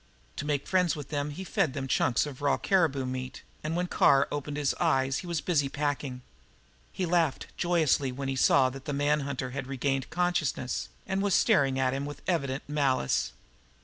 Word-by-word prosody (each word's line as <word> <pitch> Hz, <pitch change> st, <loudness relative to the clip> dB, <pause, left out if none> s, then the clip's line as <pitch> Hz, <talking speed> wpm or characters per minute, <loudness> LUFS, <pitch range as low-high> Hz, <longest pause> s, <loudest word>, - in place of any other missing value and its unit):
To -, -, -4 dB
make 145 Hz, -2 st, 0 dB
friends 180 Hz, -4 st, +2 dB
with 145 Hz, -2 st, -8 dB
them 145 Hz, -1 st, -2 dB
he 150 Hz, +6 st, -6 dB
fed 155 Hz, -6 st, 0 dB
them 135 Hz, -1 st, -4 dB
chunks 130 Hz, 0 st, +2 dB
of 140 Hz, -3 st, -8 dB
raw 145 Hz, -, +2 dB
caribou 160 Hz, -9 st, +2 dB
meat, 130 Hz, +1 st, -5 dB, 0.2 s
and 155 Hz, +2 st, -2 dB
when 180 Hz, +1 st, 0 dB
Carr 140 Hz, -5 st, +4 dB
opened 145 Hz, 0 st, -4 dB
his 145 Hz, -2 st, +1 dB
eyes 135 Hz, -5 st, +2 dB
he 180 Hz, -, -8 dB
was 170 Hz, -3 st, -1 dB
busy 145 Hz, -6 st, +1 dB
packing. 140 Hz, -3 st, -3 dB, 0.7 s
He 185 Hz, -, -2 dB
laughed 165 Hz, -5 st, +1 dB
joyously 160 Hz, -6 st, +2 dB
when 135 Hz, +2 st, -5 dB
he 135 Hz, -, -1 dB
saw 130 Hz, 0 st, +4 dB
that 135 Hz, 0 st, -10 dB
the 145 Hz, -, -3 dB
man 145 Hz, +2 st, +2 dB
hunter 135 Hz, -2 st, -4 dB
had 135 Hz, 0 st, -5 dB
regained 135 Hz, 0 st, -1 dB
consciousness, 165 Hz, -7 st, -1 dB, 0.2 s
and 195 Hz, 0 st, -1 dB
was 200 Hz, -2 st, +2 dB
staring 135 Hz, -2 st, +3 dB
at 130 Hz, -1 st, +1 dB
him 140 Hz, +1 st, -3 dB
with 145 Hz, -, -9 dB
evident 140 Hz, -6 st, -1 dB
malice. 140 Hz, -, +1 dB
145 Hz, 190 wpm, -29 LUFS, 135-160 Hz, 0.7 s, Carr